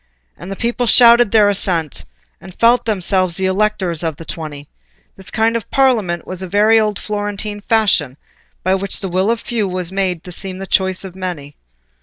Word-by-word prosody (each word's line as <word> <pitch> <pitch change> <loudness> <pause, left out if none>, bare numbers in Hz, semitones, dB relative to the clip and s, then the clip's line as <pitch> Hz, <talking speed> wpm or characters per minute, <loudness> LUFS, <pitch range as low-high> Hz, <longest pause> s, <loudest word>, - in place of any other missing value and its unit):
And 190 - -10
the - - -4
people 240 +2 -1
shouted 235 -1 +7
their 215 -2 +5
assent, 175 -6 -1 0.4
and 185 - -13
felt 235 +2 +4
themselves 185 -4 0
the 190 - -1
electors 190 -4 0
of 165 -3 -2
the 165 - -11
Twenty. 150 -3 -7 0.5
This 190 - -10
kind 225 +1 +1
of 230 - -4
"parliament" 220 -11 +1
was 185 0 -6
a 190 - -5
very 215 +4 +4
old 210 -2 0
Florentine 205 0 -4
fashion, 195 - +1 0.5
by 185 - +2
which 195 +1 -1
the 195 - -3
will 185 +4 0
of 230 0 -1
the - - -29
few 225 -4 -1
was 180 -1 -3
made 185 -3 -2
to 180 - -10
seem 185 +1 -6
the 195 - -6
choice 190 -1 0
of 190 -2 -8
the 190 - -14
many. 150 -6 -6
195 Hz, 200 wpm, -17 LUFS, 180-215 Hz, 0.5 s, shouted